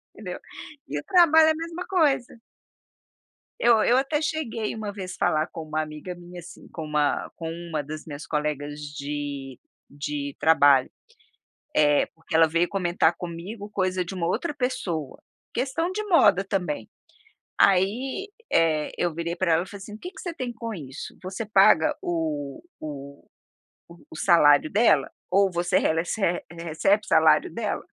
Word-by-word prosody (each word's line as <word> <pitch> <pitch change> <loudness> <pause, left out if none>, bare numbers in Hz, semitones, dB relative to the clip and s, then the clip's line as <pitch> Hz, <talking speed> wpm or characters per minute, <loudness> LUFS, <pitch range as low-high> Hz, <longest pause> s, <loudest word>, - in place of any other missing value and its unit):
entendeu? - - -7 0.5
E - - -4
o - - -9
trabalho 325 -4 +6
é - - +5
a - - -1
mesma 335 +2 -5
coisa. 285 - +1 1.2
Eu 230 -2 +5
eu 245 - +4
até 290 +3 0
cheguei 235 -10 -2
uma 215 -2 -4
vez 190 -2 -6
falar 155 +2 +1
com 165 - -8
uma 155 0 -2
amiga 155 +4 -6
minha 175 0 -11
assim, 170 - -12
com 160 - -6
uma 150 -1 0
com 165 -1 -5 0.2
uma 155 -2 -1
das 155 +2 -8
minhas 145 -1 -8
colegas 150 -1 -2 0.2
de 140 -2 -5 0.3
de 145 -1 -5
trabalho, 145 -5 +5 0.8
eh, 145 -1 +4
porque 165 +1 -10
ela 165 0 +6
veio 170 +2 +1
comentar 175 -3 +1
comigo 185 +5 -7
coisa 185 -2 0
de 190 - -7
uma 170 -2 -2
outra 295 - -1
pessoa, 175 - -3 0.3
questão 280 +8 -1
de 425 +3 -3
moda 205 - +4
também. 175 - -2 0.7
Aí, 235 - +2 0.2
eh, 155 -2 +2
eu 175 -1 0
virei 170 +1 -3
pra 170 -2 +1
ela 165 +2 +2
e - - -13
falei 200 - -10
assim: 210 +1 -9
"O - - -12
que 360 - -7
que - - -11
você 350 - -4
tem 250 -6 -5
com 230 -1 -5
isso? 140 -6 -8
Você 190 +4 -5
paga 195 -6 +5
o 155 - -3 0.2
o 140 -2 -9 0.8
o - - -10
salário 155 -4 +5
dela? 200 - +3 0.2
Ou 195 +1 +4
você 175 +2 +1
rele 160 +1 +1
rece 205 +5 -4 0.3
recebe 170 +5 0
salário - - +4
dela? - - -3
175 Hz, 160 wpm, -25 LUFS, 155-220 Hz, 1.2 s, trabalho